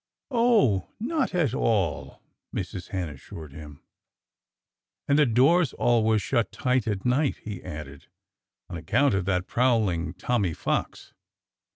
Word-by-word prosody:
"Oh! 225 - +3
Not 260 - -1
at 155 -9 +1
all!" 100 - -1 0.3
Mrs. 90 - -5
Hen 95 -3 -3
assured 75 +1 -10
him. 75 -1 -11 1.2
"And 140 +1 +3
the 150 - +5
door's 135 +7 +3
always 110 -3 +2
shut 120 -4 0
tight 125 -3 0
at 100 -3 -2
night," 130 +3 +1
he 105 -4 -6
added, 75 -5 -9 0.6
"on 85 - -6
account 115 - +2
of 95 -2 0
that 90 -2 0
prowling 105 -10 +1
Tommy 95 -3 -1
Fox." - - -3
110 Hz, 130 wpm, -26 LUFS, 90-130 Hz, 1.2 s, the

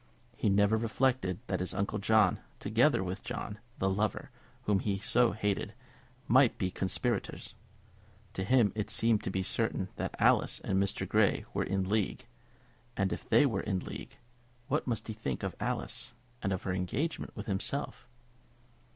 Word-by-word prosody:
He 110 - +1
never 100 +2 +4
reflected 115 -4 +1
that 95 - -1
his 90 - -1
uncle 100 +2 -1
John, 105 -2 +4 0.2
together - - +3
with - - -4
John, 105 0 -5 0.2
the 95 - 0
lover, 105 +2 -1 0.3
whom 100 -2 +2
he 100 0 -1
so 120 +4 +3
hated, 105 0 -1 0.5
might 130 0 +5
be 95 - 0
the - - -13
conspirators. 100 +4 -1 0.8
To 95 - -2
him 115 0 +4
it 105 -1 -3
seemed 115 -2 +3
to - - -3
be 95 0 -1
certain 95 -2 0
that - - -3
Alice - - +4
and 95 0 +1
Mr. 100 - -1
Grey - - +3
were - - +1
in 95 -1 -1
league; 105 -1 0 0.7
and 95 -1 +1
if - - -8
they 145 - +6
were 110 -8 0
in 95 -3 -1
league, - - -8 0.5
what - - 0
must 120 -2 -2
he 110 - -3
think 70 - -4
of - - -3
Alice, 120 - -3 0.3
and 95 - -1
of 95 - -2
her 95 - -1
engagement 95 - -2
with - - -6
himself! 110 +6 -2
100 Hz, 170 wpm, -31 LUFS, 95-115 Hz, 0.8 s, they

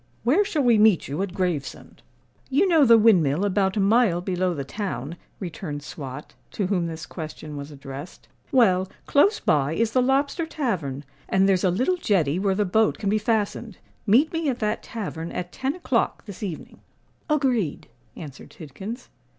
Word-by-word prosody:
Where 290 - +4
shall 315 -7 -1
we 235 -3 +4
meet 210 -5 +4
you 145 +6 -3
at 195 -2 -4
Gravesend?" 180 -7 -3 0.5
"You 295 +9 +3
know 325 -5 +5
the 230 -2 +7
windmill 185 -6 +4
about 195 0 +1
a - - +2
mile 200 -2 +3
below 180 -1 -1
the 140 - -3
town," 145 - -5 0.2
returned 160 -5 -6
Swot, 145 -1 -8 0.2
to 200 - -1
whom 180 -3 0
this 160 -1 -6
question 155 -1 -8
was 140 0 -7
addressed. 140 +2 -10 0.2
"Well, 190 -7 +3 0.2
close 390 +10 +3
by 145 0 +1
is 225 +5 0
the 255 - +3
Lobster 280 +6 +1
Tavern, 165 - -3 0.2
and 190 0 +3
there's 190 -2 +2
a 185 - +4
little 255 - +1
jetty 180 - +1
where 195 -1 +1
the 210 +1 +1
boat 220 +4 +2
can 200 -2 -1
be 215 - +2
fastened. 215 -2 -1 0.3
Meet 260 +11 +4
me 325 -3 0
at 250 - -1
that 215 -1 -1
tavern 170 -7 -6
at 175 0 -4
ten 265 +2 -2
o'clock 265 -10 -1
this 200 -4 -10
evening." 185 -7 -6 0.5
"Agreed," 255 - 0 0.3
answered 145 -5 -10
Tidkins. 195 - -8
195 Hz, 175 wpm, -24 LUFS, 160-235 Hz, 0.5 s, the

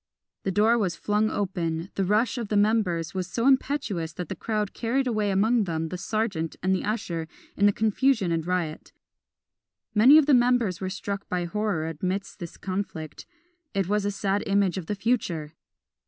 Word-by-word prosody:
The 195 - -1
door 220 +5 +3
was 185 -5 0
flung 210 +1 +1
open, 175 -4 -2
the 195 - 0
rush 220 +6 +1
of 230 - -3
the 210 - 0
members 205 -6 +1
was 185 -2 -2
so 230 +5 -2
impetuous 260 - +1
that 180 -2 -6
the - - -3
crowd 210 -3 -2
carried 255 +4 0
away 215 -4 0
among 215 +3 +2
them 160 -2 -2
the 180 - -4
serjeant 200 -7 -2
and 190 +1 +2
the 190 - 0
usher 175 -7 -2 0.3
in 205 - +4
the - - +5
confusion 220 -1 +1
and 165 -1 0
riot. 170 -3 -3 1.0
Many 250 +8 +8
of 310 - +6
the 295 - +4
members 240 -7 +3
were 190 - -2
struck 200 +1 -5
by 180 -1 -1
horror 200 -4 -1
amidst 190 +3 -3
this 170 -3 -8
conflict, 185 -5 -5 0.5
it 195 -3 +1
was 210 +1 +1
a 205 - 0
sad 200 0 -1
image 195 -2 +2
of 165 - -9
the 210 - -1
future! 190 -9 -1
200 Hz, 185 wpm, -26 LUFS, 180-220 Hz, 1.0 s, Many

